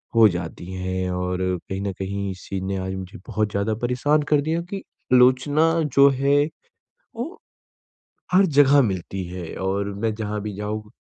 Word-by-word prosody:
हो 115 -1 +8
जाती 85 -1 -5
हैं 95 0 -2
और 90 0 -2 0.3
कहीं 95 0 -3
न 100 0 -2
कहीं 100 +1 -3
इस 90 -1 -11
चीज़ 95 -1 -3
ने 95 0 -2
आज 95 0 -3
मुझे 95 +3 -7
बहुत 110 -1 -1
ज़्यादा 100 +2 0
परेशान 130 +5 +2
कर 150 -1 +5
दिया 160 +3 -1
कि 200 - -3 0.4
आलोचना 130 +6 +5 0.2
जो 140 0 +8
है, 140 +2 +3 0.7
वो 310 - -5 0.9
हर 190 +2 +6
जगह 145 -2 +5
मिलती 95 -3 -3
है 90 -1 -7
और 100 +1 -1
मैं 110 +2 -1
जहाँ 105 -1 -3
भी 105 -1 -5
जाऊँ 105 +1 -4
105 Hz, 170 wpm, -23 LUFS, 95-140 Hz, 0.9 s, हो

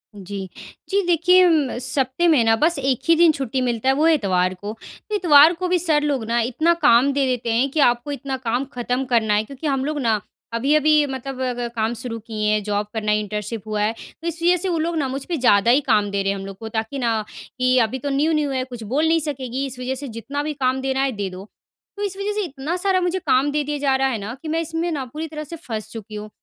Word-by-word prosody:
जी। 195 -1 -7 0.4
जी 400 0 +2
देखिए, 355 +2 +5
उम, 305 -8 +2
सप्ताह 260 +5 +1
में 300 -8 +5
ना, 225 0 +4
बस 320 +8 +2
1 265 -2 0
ही 335 - +7
दिन 335 0 +6
छुट्टी 265 -3 -2
मिलता 245 0 0
है, - - +5
वो 300 +3 +2
है 330 - +6
इतवार 185 -7 +1
को। 205 +4 -7 0.4
इतवार 320 -4 +7
को 365 +1 -3
भी 360 0 +2
सर 315 -3 +2
लोग 280 -5 0
ना, 235 +1 0
इतना 260 +9 +2
काम 275 -1 +5
दे 275 0 +1
देते 245 -2 -1
हैं 250 +5 +2
कि, 305 - -2
आपको 245 +1 +2
इतना 275 -1 -4
काम 250 +1 -1
खत्म 250 +2 -2
करना 230 -4 +2
है। 210 +1 +2
क्योंकि 275 +6 -7
हम 270 -2 0
लोग 300 0 -2
ना, 225 -5 +1 0.3
अभी-अभी 300 +5 +3
मतलब 265 0 -6
अ, 255 -1 0
ग 240 0 -4
काम 225 +1 0
शुरू 230 -2 -5
किए 215 -1 -3
हैं, 215 0 +2
जॉब 205 0 -1
करना, 215 -2 -1
इंटर्नशिप 210 +1 -3
हुआ 215 -1 -1
है। 215 +2 +1 0.3
तो 335 - -5
इस 335 0 -4
वजह 355 +1 +4
से 375 +2 -1
वो 340 - 0
लोग 335 +2 -1
ना, 285 -3 0
मुझ 265 +1 -4
पे 345 - -2
ज़्यादा 235 -3 +4
ही 270 +4 +4
काम 210 -4 +2
दे 200 0 0
रहे 195 - +1
हैं 200 - -3
हम 195 - -7
लोग 195 -1 -8
को, 220 +2 -7
ताकि 220 +4 -3
ना, 225 -3 0 0.3
कि, 255 0 +2
"अभी 260 +4 -5
तो 285 - -3
न्यू-न्यू 295 +1 +1
है, 260 -1 -1
कुछ 245 -3 -9
बोल 305 +3 +2
नहीं 330 +1 +3
सकेगी, 270 -3 -3
इस 260 -2 -6
वजह 255 +1 -2
से 280 +2 -6
जितना 280 +5 -4
भी 305 0 -3
काम 265 -2 0
देना 265 0 -1
है, 275 - +1
दे 205 -4 -4
दो।" 185 +1 -9 0.5
तो 410 - -3
इस 390 -2 -3
वजह 400 +1 -2
से 420 0 -1
इतना 295 0 -4
सारा 380 0 +1
मुझे 360 +1 0
काम 280 -4 +2
दे 300 0 0
दिया 295 +1 -3
जा 275 -2 +1
रहा 270 0 +2
है 245 - -2
ना, 210 +3 -6
कि 325 - -8
मैं 320 +1 0
इसमें 330 +1 -2
ना 280 -4 -3
पूरी 315 +2 -4
तरह 305 -1 -6
से 320 +3 -8
फँस 220 - -6
चुकी 215 -1 -8
हूँ 210 0 -7
265 Hz, 265 wpm, -21 LUFS, 225-305 Hz, 0.5 s, ही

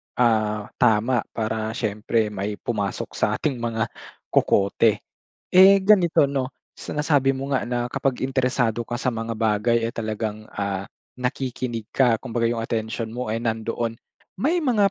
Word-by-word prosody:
ah, 110 -3 +1
tama 120 +1 +3
para 110 0 -2
siyempre 110 0 0
may 105 +1 -3
pumasok 100 -3 -3
sa - - 0
ating 135 -5 -2
mga 115 -1 -2 0.4
kokote. 100 +2 +3 0.5
Eh, 195 +2 +9
ganito 190 -6 +4
no, 135 -2 -2 0.2
sa - - -9
nasabi 145 -3 +3
mo 135 +1 -2
nga - - +1
na 120 0 -1
kapag 130 +1 -1
interesado 125 -3 0
ka 120 +1 -4
sa 125 -2 -1
mga 115 0 -4
bagay, 115 +1 +2
eh, 115 - -5
talagang, 110 -1 -4
ah, 100 -1 -2 0.3
nakikinig 125 -3 -3
ka, 120 -4 +4
kumbaga 115 -2 -1
yung 120 - -2
atensyon 110 0 -3
mo 125 -3 -3
ay 115 - 0
nandoon, 115 0 -2 0.4
may 295 - +1
mga 230 - +3
115 Hz, 150 wpm, -23 LUFS, 110-130 Hz, 0.5 s, Eh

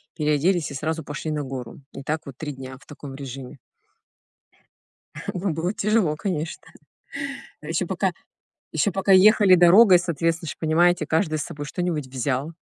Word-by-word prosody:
переоделись 155 +2 +1
и - - -6
сразу 160 +3 -3
пошли 150 +2 -5
на 150 -1 -2
гору. 130 -1 -7
И 135 - -8
так 155 +2 -2
вот 135 -3 -10
3 150 -2 -5
дня 130 0 -9
в - - -21
таком 140 -2 -10
режиме. 135 0 -8 1.7
Ну, 185 0 -1
было 170 +4 -1
тяжело, 210 -8 +1
конечно. 165 -3 -4 1.0
Ещё - - -2
пока - - 0 0.6
ещё 205 - +1
пока 195 0 +2
ехали 200 0 +7
дорогой, 180 +2 +7
соответственно 165 -1 -1
же - - -4
понимаете, 165 0 +2
каждый 155 -1 0
с - - -2
собой 145 0 -7
что-нибудь 170 -6 -2
взял. 135 +4 -2
155 Hz, 150 wpm, -24 LUFS, 140-180 Hz, 1.7 s, ехали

